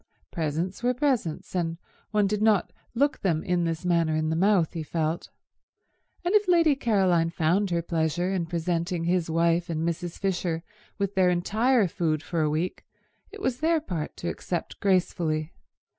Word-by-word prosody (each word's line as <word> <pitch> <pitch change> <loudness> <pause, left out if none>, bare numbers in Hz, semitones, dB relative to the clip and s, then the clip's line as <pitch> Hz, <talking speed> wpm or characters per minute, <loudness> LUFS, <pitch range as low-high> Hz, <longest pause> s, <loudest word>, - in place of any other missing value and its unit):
Presents 165 +5 -2
were 250 +1 +1
presents, 245 - -1
and 165 -2 -1 0.3
one 210 -1 +2
did 210 +1 -1
not 215 -3 +3 0.2
look 285 +5 +2
them 165 -5 0
in 180 -3 +1
this 165 +1 -3
manner 170 -3 +2
in 155 0 0
the - - 0
mouth, 185 -2 +3
he 165 - -3
felt; 160 +1 -2 1.0
and 355 - +1
if 420 -2 +4
Lady 335 -5 +5
Caroline 190 -9 +2
found 170 +5 +1
her 170 -1 0
pleasure 170 +2 0
in 175 -3 -1
presenting 170 0 -1
his 175 -1 +1
wife 170 +2 +2
and 165 0 -1
Mrs. 170 0 -3
Fisher 175 -4 -1 0.3
with 200 -1 -1
their 185 -2 +4
entire 215 +6 +2
food 160 -3 -1
for 170 -2 -1
a 155 - +2
week, 160 +4 -2 0.5
it 420 - -11
was 255 -1 0
their 325 +1 +2
part 175 - -5
to 175 - -5
accept 175 0 -4
gracefully. 170 -5 +1
175 Hz, 170 wpm, -26 LUFS, 165-200 Hz, 1.0 s, Lady